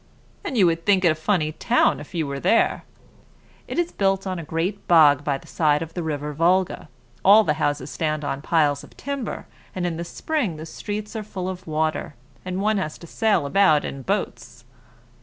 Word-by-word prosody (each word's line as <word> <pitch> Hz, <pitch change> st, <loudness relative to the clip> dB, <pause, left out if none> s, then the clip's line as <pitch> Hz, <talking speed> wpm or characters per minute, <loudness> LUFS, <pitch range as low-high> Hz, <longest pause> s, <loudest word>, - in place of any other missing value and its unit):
"And 260 Hz, -, -3 dB
you 195 Hz, -, +6 dB
would 165 Hz, -1 st, +1 dB
think 195 Hz, -3 st, +3 dB
it 170 Hz, -, +6 dB
a -, -, +2 dB
funny 155 Hz, 0 st, 0 dB
town 155 Hz, -, +2 dB
if 145 Hz, +4 st, -11 dB
you 160 Hz, -2 st, 0 dB
were 140 Hz, -1 st, -4 dB
there. 230 Hz, -, +2 dB, 0.8 s
It -, -, -5 dB
is 345 Hz, 0 st, 0 dB
built 195 Hz, -1 st, 0 dB
on 185 Hz, -2 st, -3 dB
a -, -, -6 dB
great 170 Hz, +6 st, -3 dB
bog 150 Hz, -5 st, +6 dB
by 145 Hz, -2 st, 0 dB
the -, -, -17 dB
side 150 Hz, -1 st, +1 dB
of 165 Hz, 0 st, -10 dB
the 175 Hz, -, -3 dB
river 150 Hz, -2 st, -3 dB
Volga; 180 Hz, +4 st, +1 dB, 0.3 s
all 210 Hz, +3 st, +7 dB
the 150 Hz, -, +1 dB
houses 145 Hz, -1 st, -1 dB
stand 155 Hz, -2 st, -2 dB
on 140 Hz, -1 st, -3 dB
piles 150 Hz, -3 st, +1 dB
of -, -, -16 dB
timber, 280 Hz, -4 st, -4 dB, 0.3 s
and 180 Hz, -1 st, -2 dB
in 170 Hz, -2 st, -2 dB
the 170 Hz, -, -3 dB
spring 230 Hz, -, -2 dB
the 155 Hz, +1 st, -8 dB
streets 210 Hz, +5 st, -6 dB
are 220 Hz, -, -2 dB
full 190 Hz, -3 st, -5 dB
of 185 Hz, -1 st, -6 dB
water, 155 Hz, -1 st, -1 dB, 0.3 s
and 185 Hz, +1 st, -3 dB
one 215 Hz, 0 st, +2 dB
has 155 Hz, -5 st, -4 dB
to -, -, -12 dB
sail 205 Hz, -2 st, +1 dB
about 155 Hz, -1 st, +3 dB
in 135 Hz, -, -6 dB
boats." 125 Hz, -, -4 dB
170 Hz, 205 wpm, -23 LUFS, 150-195 Hz, 0.8 s, all